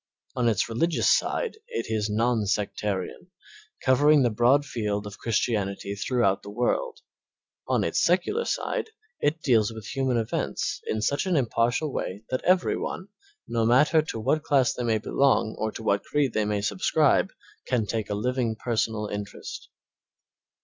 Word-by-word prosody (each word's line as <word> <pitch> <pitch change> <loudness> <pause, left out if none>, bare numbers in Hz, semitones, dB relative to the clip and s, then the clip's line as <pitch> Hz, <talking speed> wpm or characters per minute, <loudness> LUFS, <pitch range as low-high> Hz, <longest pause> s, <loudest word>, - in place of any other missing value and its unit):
On 120 -2 +2
its 110 -2 +1
religious 155 +9 0
side 465 - +1
it 475 - -3
is 110 -1 -1
non 110 0 +1
sectarian, 100 -2 -2 0.6
covering 145 +2 +5
the 120 - +2
broad 125 +6 +3
field 105 -6 -2
of 105 0 -9
Christianity 100 -3 -1
throughout 100 -1 +1
the 100 - -10
world; 125 - -1 0.7
on - - +1
its - - +1
secular 460 +3 +1
side - - -2 0.3
it 155 +3 0
deals 115 -5 +3
with 110 -2 -9
human 130 0 0
events 110 -1 -2
in 110 -1 -1
such 140 - 0
an 180 - +1
impartial 125 +2 +1
way 100 +4 -4
that 130 - 0
every 185 0 +3
one, 185 +2 -5 0.4
no 115 -1 0
matter 145 +7 +4
to 150 -7 -5
what 135 +8 +1
class 135 -5 +2
they - - -5
may 115 -2 +1
belong 115 0 +1
or 110 0 -1
to 110 - -8
what 100 -2 +1
creed 145 -4 0
they 110 - +1
may 105 -1 -1
subscribe, 155 - +2 0.4
can 120 -4 +1
take 110 +1 -3
a 105 - -1
living, 120 +1 -1
personal 110 -2 -1
interest. 105 -1 -7
115 Hz, 160 wpm, -26 LUFS, 105-140 Hz, 0.7 s, covering